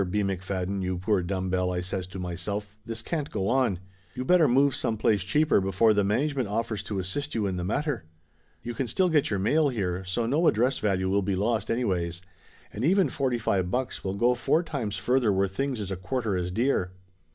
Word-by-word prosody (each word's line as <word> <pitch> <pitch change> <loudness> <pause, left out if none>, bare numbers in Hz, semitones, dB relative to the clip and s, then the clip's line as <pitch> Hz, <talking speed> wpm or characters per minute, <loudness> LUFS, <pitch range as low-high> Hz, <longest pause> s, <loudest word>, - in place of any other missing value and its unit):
McFadden, 95 0 -2
you 90 -1 -2
poor 95 +1 +1
dumb 95 +1 -2
bell," 90 0 +1
I 90 0 -1
says 90 0 -4
to 95 +1 -9
myself, 95 +4 -4
"this 115 0 -6
can't 150 0 -3
go 95 -2 -2
on. 125 -7 +2 0.4
You 130 - -3
better 175 0 +5
move 135 +3 +4
some 110 - -1
place 105 -1 +2
cheaper 150 - +2
before 95 +4 +3
the 105 -1 +2
management 130 +5 0
offers 110 0 -2
to 100 -1 -2
as 90 - -3
sist 145 +9 -3
you 110 -2 0
in 95 -2 -1
the 90 - -3
matter. 125 - -1 0.6
You 120 - -4
can 130 +2 -2
still 185 +8 +2
get 155 -4 +2
your 100 - 0
mail 145 +10 +2
here, 95 -7 -2
so 95 +6 -1
no 150 +8 +2
address 125 +5 +2
value 95 -3 0
will 100 +2 +2
be 95 0 -1
lost 110 +2 0
anyways. 90 -7 -1 0.5
And 110 - -4
even 190 +5 +4
forty 130 -4 0
five 95 -5 0
bucks 125 +5 -2
will 95 0 -2
go 120 +5 +3
four 155 +7 +1
times 125 - -3
further 120 +3 +2
where 95 0 +2
things 130 +6 -2
is 100 -2 -4
a - - -1
quarter 100 +3 -2
as 90 -1 -1
dear 95 -4 0
105 Hz, 215 wpm, -27 LUFS, 95-125 Hz, 0.6 s, better